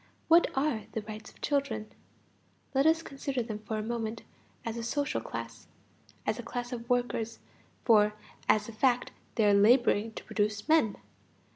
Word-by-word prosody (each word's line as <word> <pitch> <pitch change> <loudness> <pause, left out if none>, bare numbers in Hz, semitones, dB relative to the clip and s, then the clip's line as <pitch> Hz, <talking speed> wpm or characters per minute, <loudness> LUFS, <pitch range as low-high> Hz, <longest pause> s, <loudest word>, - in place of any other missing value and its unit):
What 335 +1 +6
are 270 -7 +1
the 220 - -3
rights 215 0 -8
of - - -21
children? 260 -7 -1 0.8
Let 270 +2 +4
us 325 +1 +3
consider 275 -3 -3
them 215 -2 -5
for 215 +1 -4
a 215 - -2
moment 225 0 -3 0.4
as 230 -1 -3
a 235 - -3
social 285 +5 -1
class, - - -7 0.6
as - - 0
a - - -2
class 245 0 -5
of 235 -1 -6
workers, 245 -2 0 0.5
for 210 -2 +5 0.3
as 215 - +4
a - - -6
fact 245 +2 +2 0.2
they 220 - +3
are 205 - +5
laboring 220 +1 +4
to - - -7
produce 210 -1 -1
men. 310 -10 +4
230 Hz, 165 wpm, -30 LUFS, 215-260 Hz, 0.8 s, What